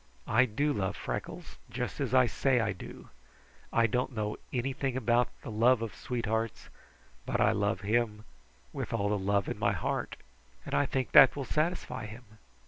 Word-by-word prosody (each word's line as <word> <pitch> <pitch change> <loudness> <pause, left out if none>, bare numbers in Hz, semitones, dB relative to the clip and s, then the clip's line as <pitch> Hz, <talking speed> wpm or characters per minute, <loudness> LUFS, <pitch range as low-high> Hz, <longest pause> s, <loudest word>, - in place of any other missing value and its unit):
I 125 +4 +4
do 145 +6 0
love 95 -6 -2
Freckles, - - -6
just 125 +2 -4
as 130 -5 -1
I 130 -1 +6
say 130 +1 +1
I 115 -2 +1
do. 90 - -11 0.6
I 115 - +3
don't 125 +3 -1
know 105 -1 -2
anything 130 +1 -2
about 120 0 +2 0.2
the - - -6
love 115 +2 +3
of 115 - -5
sweethearts, 115 -2 -3 0.5
but - - -2
I - - +4
love 100 +2 0
him 105 0 0 0.5
with - - -4
all 100 0 0
the 105 -1 0
love 100 0 +1
in - - -4
my - - +2
heart, - - -2 0.5
and - - -6
I 70 - +2
think 130 -2 -2
that 135 -4 +8
will 140 -2 -4
satisfy 155 -4 -2
him." 115 +4 -10
115 Hz, 175 wpm, -30 LUFS, 105-130 Hz, 0.6 s, that